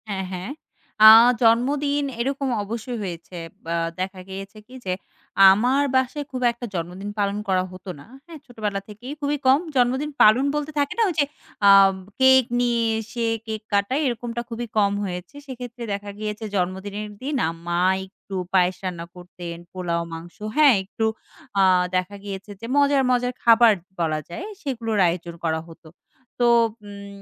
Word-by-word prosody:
হ্যাঁ, 190 -2 -3
হ্যাঁ। 185 +6 -5 0.5
আ - - +13 0.3
জন্মদিন 280 +5 +2 0.2
এরকম 275 +3 -1 0.2
অবশ্যই 230 +4 -5
হয়েছে 175 -1 -7 0.3
অ্যা 170 0 -1 0.2
দেখা 185 0 -4
গিয়েছে 195 +2 -8
কি 250 - -16
যে 185 - 0 0.6
আমার 250 +8 +2
বাসায় 260 +3 0
খুব 255 -1 -4
একটা 235 +1 -8
জন্মদিন 180 +4 -5
পালন 200 0 0
করা 185 -1 +2
হতো 185 +1 -10
না, - - -13 0.2
হ্যাঁ? 330 -2 -11
ছোটোবেলা 215 -5 -3
থেকেই 240 +7 -8
খুবই 290 +1 0
কম 265 +2 +6 0.2
জন্মদিন 260 +4 +1
পালন 230 +6 +5
বলতে 295 +1 -2
থাকে 285 0 0
না 465 - +3
ওই - - -2
যে 285 - +4 0.4
আ - - +9 0.5
কেক 260 0 +7 0.2
নিয়ে 240 -1 +1 0.2
এসে 230 +2 -4 0.2
কেক 220 -1 -4
কাটায় 200 +9 +1
এরকমটা 235 -1 -3
খুবই 235 +1 -4
কম 200 -1 +4
হয়েছে 180 +6 -6
সেক্ষেত্রে 245 -2 -8
দেখা 200 0 -5
গিয়েছে 215 +1 -4
জন্মদিনের 195 +3 -3
দিন 285 +3 -3
আ - - 0 0.2
মা 175 0 0 0.3
একটু 195 0 -11 0.2
পায়েস 185 -1 +3
রান্না 175 -3 -4
করতেন, 175 -1 -8 0.2
পোলাও 175 -2 -2
মাংস 165 +1 -9 0.2
হ্যাঁ, 290 -5 +7
একটু 215 +3 -3 0.6
আ - - +6 0.3
দেখা 185 +2 -1
গিয়েছে 200 0 -7
যে - - -6
মজার, 280 -1 +4
মজার 250 0 +1
খাবার 230 -1 +6 0.3
বলা 155 -2 0
যায় 255 - -6 0.2
সেগুলোর 230 -6 -2
আয়োজন 170 0 -3
করা 160 -1 0
হতো। 165 0 -15 0.5
তো 240 - +3 0.4
উম 200 0 -10
215 Hz, 160 wpm, -23 LUFS, 185-255 Hz, 0.6 s, আ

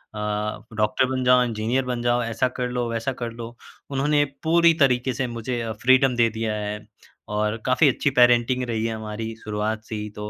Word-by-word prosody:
अ, 105 - -5 0.5
doctor 105 +3 +1
बन 130 0 -2
जाओ, 125 0 +5
engineer 120 +3 -1
बन 125 -1 -3
जाओ, 120 0 +1
ऐसा 115 +2 0
कर 125 - -1
लो, 120 -1 -2
वैसा 115 +3 -2
कर 120 - -3
लो। 115 0 -9 0.4
उन्होंने 145 +2 +2 0.2
पूरी 170 +1 +5
तरीके 125 0 +2
से 125 +1 -2
मुझे 120 +1 -4
अ, 115 -1 -3
फ़्रीडम 130 +4 +3
दे 120 -1 +3
दिया 110 0 -3
है 105 0 -4 0.6
और 105 +1 0
काफ़ी 130 +4 +4
अच्छी 140 +2 0
पेरेंटिंग 120 +1 +4
रही 115 -2 -2
है 115 -1 -2
हमारी 110 +1 -6
शुरुआत 110 +1 -3
से 110 - -7
ही 105 0 -5
तो 105 0 -6
120 Hz, 200 wpm, -23 LUFS, 110-130 Hz, 0.6 s, जाओ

